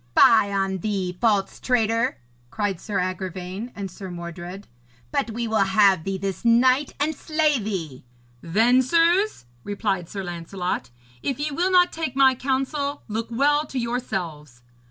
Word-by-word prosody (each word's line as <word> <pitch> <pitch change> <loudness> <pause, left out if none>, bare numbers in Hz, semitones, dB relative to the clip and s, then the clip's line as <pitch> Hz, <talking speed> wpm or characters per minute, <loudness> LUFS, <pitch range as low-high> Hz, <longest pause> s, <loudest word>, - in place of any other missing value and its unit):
'Fie 220 -3 +6
on 195 -1 -1
thee, 190 -2 -2
false 205 -4 +1
traitor,' 230 0 +1 0.3
cried 205 - -2
Sir 205 -2 -3
Agravaine 185 +4 -4
and 195 -2 -5
Sir 190 +1 -8
Mordred, 175 +2 -7 0.5
'but 225 - 0
we 230 +1 -3
will 220 -1 +1
have 195 -3 +4
thee 195 0 -2
this 195 -1 -4
night 255 +4 +3
and 300 +2 +1
slay 310 -2 +1
thee.' 180 - -5 0.4
'Then, 225 +9 +3
sirs,' 340 - +2 0.2
replied 200 -4 -2
Sir 195 -1 -5
Lancelot, 175 -4 -4 0.3
'if 270 -2 -2
ye 300 +1 -1
will 350 +6 +1
not 360 -1 +5
take 320 -6 -4
my 270 -1 +6
counsel, 275 +3 -2
look 220 +1 -3
well 290 +5 +2
to 270 - -6
yourselves.' 175 - -4
215 Hz, 150 wpm, -24 LUFS, 185-260 Hz, 0.5 s, Fie